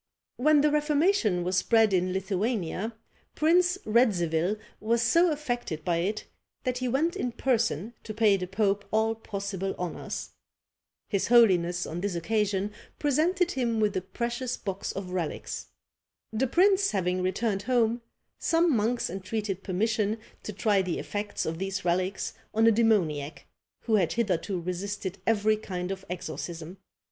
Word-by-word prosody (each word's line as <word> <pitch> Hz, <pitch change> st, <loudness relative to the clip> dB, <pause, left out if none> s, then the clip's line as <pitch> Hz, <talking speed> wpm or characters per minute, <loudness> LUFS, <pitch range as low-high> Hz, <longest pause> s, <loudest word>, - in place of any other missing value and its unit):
When 300 Hz, +3 st, +5 dB
the 300 Hz, 0 st, +3 dB
Reformation 300 Hz, -, +2 dB
was 180 Hz, +1 st, 0 dB
spread 225 Hz, 0 st, +4 dB
in 185 Hz, 0 st, +2 dB
Lithuania, 195 Hz, +2 st, -2 dB, 0.4 s
Prince 355 Hz, +4 st, +3 dB
Radzivil 195 Hz, -5 st, +2 dB, 0.2 s
was 230 Hz, +2 st, +1 dB
so 335 Hz, +10 st, +4 dB
affected 245 Hz, -, -3 dB
by 175 Hz, -2 st, +1 dB
it, 200 Hz, +6 st, -2 dB, 0.4 s
that 250 Hz, -1 st, -1 dB
he 255 Hz, -, -1 dB
went 295 Hz, +8 st, +1 dB
in 250 Hz, -, -2 dB
person 230 Hz, -, 0 dB
to 220 Hz, -, -6 dB
pay 215 Hz, -2 st, +4 dB
the 185 Hz, -2 st, -3 dB
pope 200 Hz, +1 st, +1 dB
all 220 Hz, +1 st, +2 dB
possible 200 Hz, -3 st, -4 dB
honours. 180 Hz, -2 st, -5 dB, 0.8 s
His 200 Hz, -3 st, 0 dB
holiness 180 Hz, -7 st, +4 dB
on 170 Hz, +2 st, -5 dB
this 200 Hz, -2 st, -2 dB
occasion 200 Hz, +3 st, 0 dB, 0.3 s
presented 335 Hz, +5 st, +2 dB
him 235 Hz, -4 st, 0 dB
with 210 Hz, -2 st, +1 dB
a 185 Hz, -, 0 dB
precious 240 Hz, +5 st, -3 dB
box 195 Hz, -1 st, -4 dB
of 185 Hz, -1 st, -6 dB
relics. 175 Hz, -4 st, -4 dB, 0.7 s
The 250 Hz, +5 st, +1 dB
prince 385 Hz, +7 st, +4 dB
having 185 Hz, -3 st, 0 dB
returned 195 Hz, +2 st, 0 dB
home, 235 Hz, 0 st, +1 dB, 0.4 s
some 330 Hz, -3 st, +3 dB
monks 230 Hz, +3 st, +1 dB
entreated 195 Hz, +1 st, -3 dB
permission 215 Hz, +3 st, 0 dB, 0.2 s
to -, -, -5 dB
try 205 Hz, -1 st, +2 dB
the 185 Hz, -3 st, -2 dB
effects 205 Hz, 0 st, -3 dB
of 160 Hz, +1 st, -3 dB
these 195 Hz, 0 st, -3 dB
relics 185 Hz, +2 st, 0 dB, 0.2 s
on 225 Hz, +1 st, +4 dB
a 230 Hz, -, +7 dB
demoniac, 180 Hz, -10 st, +1 dB, 0.4 s
who 220 Hz, -2 st, +2 dB
had 175 Hz, -5 st, +1 dB
hitherto 195 Hz, -4 st, 0 dB
resisted 190 Hz, +2 st, -4 dB
every 215 Hz, -1 st, +3 dB
kind 185 Hz, -3 st, -4 dB
of 190 Hz, 0 st, -5 dB
exorcism. 170 Hz, +1 st, -6 dB
210 Hz, 145 wpm, -28 LUFS, 185-235 Hz, 0.8 s, a